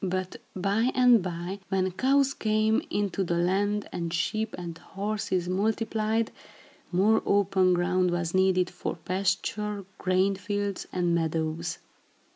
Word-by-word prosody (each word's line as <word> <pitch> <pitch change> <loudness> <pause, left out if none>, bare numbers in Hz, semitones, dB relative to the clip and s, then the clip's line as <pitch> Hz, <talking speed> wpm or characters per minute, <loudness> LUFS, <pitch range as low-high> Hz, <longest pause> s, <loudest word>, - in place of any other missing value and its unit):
But 185 0 -2 0.2
by 200 +6 +1
and 250 -3 +6
by, 175 +2 -4
when 190 -1 +1
cows 275 +6 +2
came 215 -2 +1
into 200 -2 -1
the 170 -1 -1
land 200 +4 +1
and 170 -1 -3
sheep 210 +6 -1
and 170 -2 -6
horses 200 0 -3
multiplied, 220 +3 0 0.6
more 205 +5 +3
open 195 -2 +3
ground 180 +1 +2
was 175 -1 -1
needed 185 -1 +3
for 175 - -4
pasture, 200 +3 -2
grain 185 +2 +2
fields 205 0 -3
and 175 -1 +1
meadows. 165 0 -1
190 Hz, 125 wpm, -27 LUFS, 175-210 Hz, 0.6 s, and